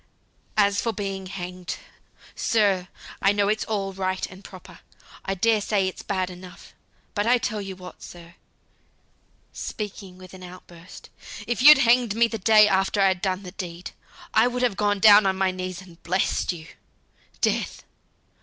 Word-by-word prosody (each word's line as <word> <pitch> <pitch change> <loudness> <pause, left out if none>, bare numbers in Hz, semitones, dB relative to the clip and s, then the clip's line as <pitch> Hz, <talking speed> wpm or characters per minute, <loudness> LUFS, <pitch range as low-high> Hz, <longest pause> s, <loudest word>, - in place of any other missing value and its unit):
"As 200 -1 +3
for 230 - -1
being 195 -2 -5
hanged, 180 -1 -6 0.6
sir, 200 -5 +1 0.3
I 195 - +4
know 205 0 +1
it's 215 +1 0
all 195 -3 -3
right 185 0 -2
and 190 +1 -13
proper. 185 -2 -13 0.5
I 195 - -2
dare 220 +3 +2
say 200 -2 0
it's 185 - -6
bad 185 -3 -2
enough; 180 0 -13 0.4
but 205 +1 -1
I 250 +1 +5
tell 215 -3 -3
you 195 -1 -7
what, 180 0 -12
sir," 170 0 -12 1.2
speaking 200 -3 -7
with 185 0 -14
an 185 - -12
out 180 0 -11
burst, 170 0 -14 0.3
"if 240 0 -2
you'd 300 +2 +10
hanged 240 -4 +3
me 235 +1 +4
the 225 -1 -5
day 215 +1 +6
after 195 +1 +1
I'd 190 -2 +2
done 190 0 -2
the 180 - -8
deed, 175 -1 -7 0.4
I - - +5
would 250 0 -2
have 240 -6 +1
gone 205 0 +1
down 205 0 +7
on 190 0 0
my 190 -1 +1
knees 185 0 -6
and 175 -2 -17
blessed 185 +2 0
you. 165 -3 -9 0.7
Death! - - -1
195 Hz, 170 wpm, -24 LUFS, 185-210 Hz, 1.2 s, you'd